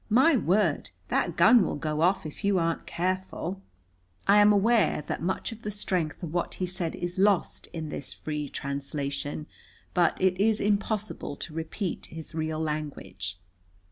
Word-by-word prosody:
My 265 +8 +6
word, 190 - +2 0.2
that 170 - +1
gun 225 +5 +7
will - - -1
go 150 0 -2
off 180 +1 +3
if 155 +6 -8
you 200 -1 +3
aren't 165 -1 0
careful!" 185 +1 -2 0.7
I 200 +1 +7
am 205 0 +7
aware 205 -6 +3
that - - -3
much 190 +6 -1
of 225 0 -9
the 210 - -4
strength 185 -5 -2
of 165 -2 -4
what 175 - -1
he 185 - -1
said 175 -2 -3
is 175 +1 -4
lost 200 -2 +2
in 160 -2 -5
this 140 - -6
free 150 -2 -4
translation. 140 +1 -3 0.5
But 175 -2 +3
it 185 0 +2
is 215 0 +3
impossible 210 -5 -1
to 155 - -6
repeat 165 +4 -4
his 160 0 -9
real 155 -1 -2
language. 145 - -4
175 Hz, 165 wpm, -28 LUFS, 155-200 Hz, 0.7 s, gun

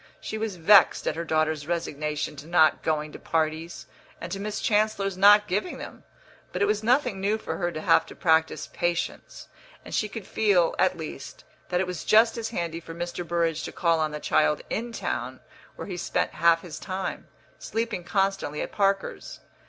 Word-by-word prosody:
She 220 - -5
was 220 -3 -3
vexed 190 +4 +5
at - - 0
her 170 - -3
daughter's 155 -2 0
resignation 150 -3 -3
to 145 +2 -10
not 160 -2 +4
going 155 -1 -1
to - - -10
parties 160 +1 -2 0.3
and - - -7
to 195 - -3
Miss 210 +1 -3
Chancellor's 210 -2 +1
not 205 +2 +7
giving 205 - -2
them; - - -10 0.5
but 180 - -4
it 200 - +3
was 210 +1 0
nothing 235 -4 +1
new 205 +3 +1
for - - -5
her 175 -1 -1
to 155 -2 -5
have 165 - +4
to - - -11
practise 160 -2 +1
patience, 175 0 -3 0.4
and - - -9
she 215 - 0
could 205 -1 -7
feel, 195 -6 +2
at 185 - +3
least, 155 -3 -8 0.3
that 180 - +1
it 190 - +1
was 180 -3 -5
just 225 +1 +5
as 225 -1 -3
handy 170 -6 -3
for 165 0 -10
Mr. 175 +1 -4
Burrage 165 -2 0
to - - -5
call 165 -2 +1
on 155 -1 +1
the 150 0 -6
child 150 0 +2
in 235 +2 -2
town, - - -4 0.4
where - - -7
he 185 -3 -5
spent - - -1
half 165 +1 +3
his 160 -4 -8
time, 190 0 -5 0.3
sleeping 225 -5 -3
constantly 195 -4 -1
at - - -7
Parker's. 195 -1 -1
175 Hz, 190 wpm, -26 LUFS, 160-205 Hz, 0.5 s, not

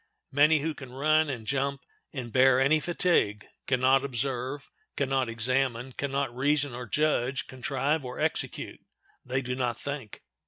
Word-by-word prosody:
Many 150 +2 +4
who 160 +1 -1
can 130 -4 -10
run 155 +3 +2
and 120 -5 -5
jump 140 +3 -1 0.3
and 125 -4 -6
bear 130 0 +5
any 145 +4 +4
fatigue 165 - +1 0.2
can 130 -2 +2
not 135 +1 +4
observe, 130 +1 -2 0.3
can 140 -1 0
not 135 -3 +1
examine, 125 +2 -1
can 140 +2 -4
not 135 -3 -1
reason 145 +1 +2
or 120 0 -6
judge, 140 0 +1
contrive 135 +3 -1
or 125 -1 -7
execute—they 130 +1 -4
do 125 0 -3
not 125 -2 -2
think. 140 -7 -6
135 Hz, 155 wpm, -28 LUFS, 125-145 Hz, 0.3 s, bear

